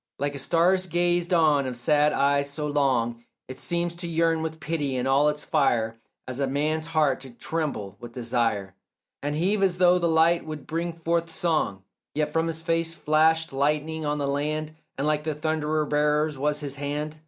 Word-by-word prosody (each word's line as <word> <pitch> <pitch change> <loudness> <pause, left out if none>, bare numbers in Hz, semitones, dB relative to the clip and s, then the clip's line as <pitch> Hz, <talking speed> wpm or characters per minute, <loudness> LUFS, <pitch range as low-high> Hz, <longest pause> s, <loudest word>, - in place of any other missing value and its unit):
Like 145 +1 -1
a 140 - -6
star's 180 +6 +2
gazed 175 0 +1
on 155 -5 +3
of 125 -2 -4
sad 150 +4 +3
eyes 140 0 +2
so 150 +2 -4
long 125 -5 0 0.2
It 130 0 -8
seems 170 0 -1
to 175 0 -5
yearn 165 -1 +1
with 160 0 -4
pity, 150 -3 -2
and 125 +1 -1
all 140 +3 +4
its 150 0 -4
fire 115 -4 +1 0.3
As 130 +1 -4
a 140 - +1
man's 155 +4 -1
heart 155 -5 +2
to 135 - -10
tremble 120 - -4
with 120 0 -9
desire 115 -5 -1 0.5
And 145 +1 -2
heave 195 +6 +1
as 185 -2 +2
though 180 0 +5
the 170 - +1
light 165 +1 +4
would 155 -3 -7
bring 170 +2 -2
forth 165 0 -1
song; 155 - -1 0.3
Yet 150 0 0
from 165 0 +1
his 165 0 -4
face 165 0 0
flashed 160 0 +2
lightning 150 +3 0
on 150 0 -1
the 140 -1 -1
land, 155 +2 -2 0.2
And 135 - -1
like 150 0 +1
the 155 -1 -2
thunder 155 0 0
bearer's 150 +1 +1
was 150 +2 -1
his 140 -1 -5
hand. 150 +2 -4
150 Hz, 190 wpm, -26 LUFS, 140-165 Hz, 0.5 s, though